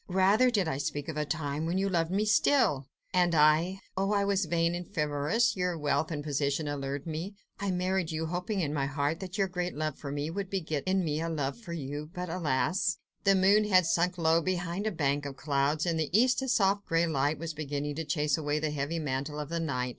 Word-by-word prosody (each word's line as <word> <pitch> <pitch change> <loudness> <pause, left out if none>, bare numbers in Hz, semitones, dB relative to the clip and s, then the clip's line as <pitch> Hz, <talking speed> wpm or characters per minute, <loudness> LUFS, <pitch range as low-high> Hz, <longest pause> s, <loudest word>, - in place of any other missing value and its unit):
"Rather 195 +7 +4
did 205 -8 +1
I 135 -3 -2
speak 145 0 -3
of - - -2
the 150 0 -1
time 150 0 -2
when 175 +3 0
you 195 +1 +1
loved 170 -4 +1
me 200 +3 +1
still! 210 - +3 0.3
and 175 -2 +3
I... 160 +5 +4
oh! 195 +2 0
I 200 -1 +2
was 200 -1 +1
vain 170 0 +1
and 175 +1 -6
frivolous; 150 +8 +1
your 180 -2 -1
wealth 145 0 0
and 150 -3 -4
position 145 +1 -1
allured 140 -1 -3
me: 165 +5 -5 0.2
I 200 - -2
married 185 -1 0
you, 160 0 -2
hoping 180 +4 -2
in 150 -3 -1
my 140 -2 0
heart 145 +3 -1
that 190 +1 -6
your 195 -1 +2
great 180 -1 -3
love 155 -1 -3
for 140 - -6
me 145 +2 -3
would 195 +1 -4
beget 160 -7 -2
in 190 -1 +2
me 155 0 -1
a 165 - -2
love 145 -4 -2
for 175 -7 -8
you... 145 -1 -5
but, 180 -1 -4
alas!.. 165 +2 0
." - - -48
The 195 0 +6
moon 200 +3 +4
had 185 -4 +4
sunk 175 +2 +1
low 165 -1 +3
down 165 - -1
behind 180 +2 -1
a - - 0
bank 145 -4 0
of 135 -1 -8
clouds. 145 +2 0
In 170 -2 0
the 155 -2 -1
east 250 +2 +3
a 265 - -3
soft 200 -4 +2
grey 165 +1 +2
light 145 -1 0
was 165 +1 -5
beginning 145 -1 -3
to 160 - -2
chase 150 -1 0
away 150 -1 -1
the 155 0 -1
heavy 150 +3 -2
mantle 145 0 -3
of 150 -1 -5
the 170 0 -2
night. 125 -6 -1
165 Hz, 235 wpm, -29 LUFS, 145-185 Hz, 0.3 s, The